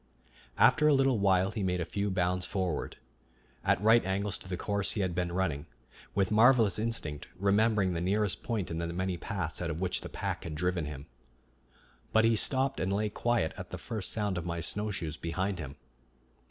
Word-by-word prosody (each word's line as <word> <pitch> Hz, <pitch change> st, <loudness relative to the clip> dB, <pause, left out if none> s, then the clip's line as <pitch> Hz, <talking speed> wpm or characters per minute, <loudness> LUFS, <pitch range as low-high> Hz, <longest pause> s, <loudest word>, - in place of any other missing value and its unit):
After 150 Hz, 0 st, +5 dB
a 150 Hz, -, +6 dB
little 135 Hz, -4 st, +3 dB
while 95 Hz, -1 st, +3 dB
he 110 Hz, -, -4 dB
made 90 Hz, -1 st, 0 dB
a 85 Hz, -, -1 dB
few 100 Hz, +4 st, -2 dB
bounds 90 Hz, -1 st, 0 dB
forward, 90 Hz, -5 st, -2 dB, 0.7 s
at 100 Hz, -1 st, +3 dB
right 115 Hz, +1 st, +6 dB
angles 100 Hz, +2 st, -1 dB
to -, -, -11 dB
the 90 Hz, -, -2 dB
course 100 Hz, +1 st, -1 dB
he 105 Hz, -, -1 dB
had 95 Hz, -2 st, 0 dB
been 90 Hz, 0 st, -1 dB
running, 85 Hz, -4 st, -1 dB, 0.5 s
with 100 Hz, 0 st, +1 dB
marvelous 110 Hz, -2 st, +5 dB
instinct 105 Hz, -10 st, -3 dB
remembering 100 Hz, -1 st, +2 dB
the 85 Hz, -, -2 dB
nearest 100 Hz, +2 st, 0 dB
point 110 Hz, -7 st, -2 dB
in 80 Hz, -, -3 dB
the 85 Hz, -, -2 dB
many 90 Hz, +2 st, -2 dB
paths 85 Hz, -2 st, -4 dB
out 85 Hz, -, -2 dB
of 80 Hz, 0 st, -3 dB
which 90 Hz, -1 st, -1 dB
the -, -, -7 dB
pack -, -, -3 dB
had 80 Hz, -2 st, -5 dB
driven 90 Hz, 0 st, 0 dB
him. 75 Hz, -2 st, -7 dB, 1.1 s
But 110 Hz, 0 st, +5 dB
he 115 Hz, 0 st, +4 dB
stopped 135 Hz, +4 st, +1 dB
and 90 Hz, -, 0 dB
lay 105 Hz, +2 st, 0 dB
quiet 115 Hz, -6 st, 0 dB
at -, -, -7 dB
the -, -, -5 dB
first 110 Hz, -5 st, -4 dB
sound 105 Hz, -4 st, -1 dB
of -, -, -6 dB
my 85 Hz, 0 st, -2 dB
snowshoes 85 Hz, -4 st, -3 dB
behind 95 Hz, +3 st, -2 dB
him. 70 Hz, -3 st, -6 dB
95 Hz, 195 wpm, -30 LUFS, 85-105 Hz, 1.1 s, a